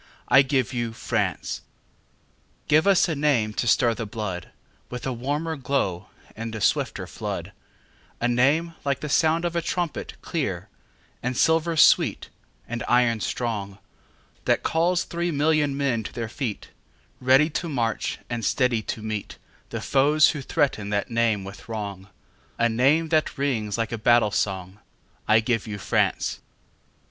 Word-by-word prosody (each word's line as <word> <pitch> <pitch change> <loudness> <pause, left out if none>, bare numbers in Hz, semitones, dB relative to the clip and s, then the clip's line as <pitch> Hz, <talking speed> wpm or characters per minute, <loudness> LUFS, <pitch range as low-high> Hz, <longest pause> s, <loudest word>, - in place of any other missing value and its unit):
I 135 - +8
give 135 -2 0
you 120 -2 -2
France! - - -2 1.1
Give 155 +4 +4
us 195 -1 +5
a 165 - -1
name 140 -8 +1
to 120 - -2
stir 115 +1 +4
the 115 0 -5
bloodWith 105 +3 -7
a 130 - -1
warmer 145 +7 -2
glow 115 - -1 0.3
and 115 0 -5
a - - -4
swifter - - 0
flood,—A 120 - -7
name 140 +8 +2
like 140 -1 -1
the 150 - -4
sound 160 +3 +2
of 170 0 -2
a 170 - +1
trumpet, 170 -1 -3
clear, - - -3 0.5
And 125 +1 -2
silver 160 0 +2
sweet, - - +4 0.4
and 120 0 -4
iron 120 -2 +3
strong, 105 -4 -3 0.7
That - - +2
calls 170 +2 +2
three 170 +1 -2
million 150 -2 +1
men 135 -5 0
to 105 - -7
their 115 -2 -3
feet, 120 -4 -4 0.5
Ready 135 +5 +4
to 170 +2 -3
march, 115 -6 -1
and 120 -1 -4
steady 125 -2 +2
to 110 0 -5
meetThe 110 -2 -7
foes 150 +3 +4
who 150 - -5
threaten 135 -8 0
that 100 +2 -1
name 115 -3 +1
with 100 +3 -11
wrong,—A 105 +2 -5
name 140 +8 +3
that 155 -2 +1
rings 115 -7 -1
like 115 -1 -1
a 115 - -3
battle 115 -1 +4
song.I 95 +3 -2
give 115 -1 -1
you 105 -1 -4
France! 100 - 0
125 Hz, 145 wpm, -25 LUFS, 110-150 Hz, 1.1 s, I